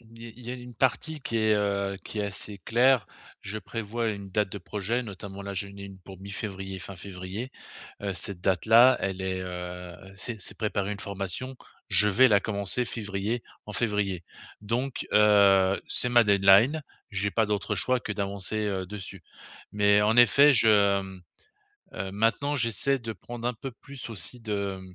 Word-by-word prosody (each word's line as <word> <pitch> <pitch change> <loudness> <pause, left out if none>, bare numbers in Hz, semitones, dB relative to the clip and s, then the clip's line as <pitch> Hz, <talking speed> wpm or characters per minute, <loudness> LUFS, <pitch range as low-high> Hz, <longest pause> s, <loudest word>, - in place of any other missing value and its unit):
il 115 0 -15
y 115 -1 -9
il 120 0 -14
y - - -4
a - - -3
une 125 -1 -10
partie 150 +6 0
qui 115 -3 -3
est 110 -1 +3
heu, 100 -1 0
qui 105 - -5
est - - 0
assez 100 0 -6
claire. 120 -1 +3 0.4
Je 105 +2 -4
prévois 115 +1 -3
une 100 -2 -5
date 105 +1 +1
de 100 - -6
projet, 105 +6 -2
notamment 100 -2 -8
là 100 0 -5
j'en 100 +1 -2
ai 100 - -9
une 95 -1 -11
pour 95 0 -12
mi-février, 95 -1 -6
fin 95 +2 -9
février. 95 +6 -7 0.5
Heu, 100 -1 -2
cette 90 0 -3
date-là 110 +7 +5
elle 95 -1 -2
est, 95 0 -2
heu, 90 -1 -6 0.2
c'est 110 +3 -5
c'est - - -4
préparer 105 -2 -1
une 100 - -7
formation. 100 +7 -5 0.3
Je 105 - +5
vais 125 +6 +5
la 100 -3 +4
commencer 100 +3 -1
février, 105 0 -3 0.2
en 105 - -7
février. 105 -5 -1 0.4
Donc, 120 +5 -3
heu, 100 -2 +5
c'est 125 - +4
ma 120 -1 +6
deadline. 100 +9 +5 0.3
J'ai 100 0 -1
pas 115 - +2
d'autre 105 0 -1
choix 125 +7 +1
que 105 - -4
d'avancer, 100 +1 -2
heu, 95 -2 -3
dessus. 100 -2 -8 0.5
Mais, 105 0 +4
en 105 +2 +2
effet, 140 +5 +7
je, 115 -3 +5
hem, 100 -3 +2 0.7
heu 95 +1 -4
maintenant 115 +7 +1
j'essaie 125 +3 +1
de 115 -1 -5
prendre 120 +4 -7
un 125 - -3
peu 130 +4 -7
plus 135 +1 -10
aussi 115 +2 -5
de, 100 -3 -3
hem, 95 -1 -13
105 Hz, 185 wpm, -27 LUFS, 95-115 Hz, 0.7 s, effet